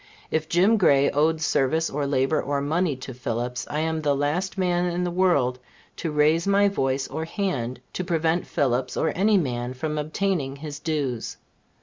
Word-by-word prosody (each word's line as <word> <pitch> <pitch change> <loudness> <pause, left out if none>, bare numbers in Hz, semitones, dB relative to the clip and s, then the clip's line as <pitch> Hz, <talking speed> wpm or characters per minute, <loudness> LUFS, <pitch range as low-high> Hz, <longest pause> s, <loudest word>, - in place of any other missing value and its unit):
If 160 0 -1
Jim 195 +6 +4
Gray 140 -7 +4
owed 155 +2 +2
service, 160 +1 +1
or 145 0 -2
labor, 135 +2 +1
or 140 0 -1
money, 155 +2 0
to 130 0 -8
Phillips, 120 0 -3
I 150 - -1
am 160 0 -1
the 145 -2 +1
last 155 +8 -1
man 180 -1 +1
in 175 +1 -1
the 175 - -1
world 155 -9 +2 0.4
to 165 - -3
raise 155 +4 +3
my 200 0 +4
voice 135 -7 -1
or 160 +4 -4
hand 140 - -2
to 185 - -2
prevent 165 0 0
Phillips, 130 -2 0
or 160 - +1
any 205 +3 +4
man, 125 -6 -2
from 150 +3 -3
obtaining 155 -2 -1
his 145 0 -7
dues. 145 -7 -2
155 Hz, 180 wpm, -25 LUFS, 135-175 Hz, 0.4 s, Jim